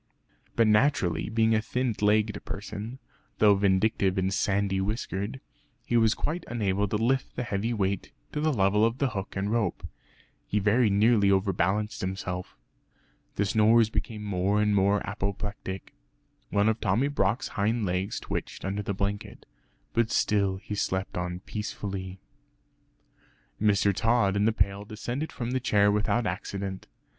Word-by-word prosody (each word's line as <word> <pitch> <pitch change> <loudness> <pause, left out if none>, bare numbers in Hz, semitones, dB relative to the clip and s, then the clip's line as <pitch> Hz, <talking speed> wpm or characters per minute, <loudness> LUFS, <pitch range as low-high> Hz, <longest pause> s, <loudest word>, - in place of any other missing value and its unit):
But 115 - +4
naturally 105 - +2
being 110 0 +2
a 110 - +3
thin 125 +2 -1
legged 105 0 +2
person 105 +4 -6 0.4
(though 105 -1 +6
vindictive 95 0 +2
and 95 +1 +1
sandy 100 -1 +1
whiskered) 105 +2 -3 0.5
he 120 - -1
was 110 -1 +4
quite 165 +3 -3
unable 105 -3 0
to 105 - -2
lift 130 +4 0
the 125 - -2
heavy 105 +1 -2
weight 100 -4 -1 0.2
to 150 - -2
the 155 0 +2
level 105 -3 +3
of 115 +2 +2
the 140 -1 +1
hook 100 -2 -5
and 100 +1 -1
rope. 110 -6 -1 0.6
He 105 - -1
very 105 +3 +3
nearly 100 0 +4
overbalanced 95 +2 +1
himself. 90 -1 -4 0.8
The 100 - +1
snores 110 +2 +4
became 110 -2 -3
more 100 0 +1
and 105 0 +2
more 100 +1 +2
apoplectic. 100 -1 -4 0.6
One 100 +1 +2
of 110 0 +1
Tommy 110 +6 +2
Brock's 130 -5 0
hind 110 +1 0
legs 90 +2 -1
twitched - - -5
under 100 +2 -2
the 100 -1 -3
blanket, 100 +1 -4 0.5
but 115 -1 +2
still 100 -4 +1
he 105 - -7
slept 95 -2 -2
on 90 0 -3
peacefully. 95 -3 -5 1.4
Mr. 100 -1 +3
Tod 110 -1 +2
and 100 +1 +2
the - - +4
pail 100 -2 0
descended 120 +8 -4
from 120 -2 -4
the 130 - +1
chair 105 -4 +3
without 105 +3 +1
accident. 95 0 -4
105 Hz, 150 wpm, -27 LUFS, 95-110 Hz, 1.4 s, though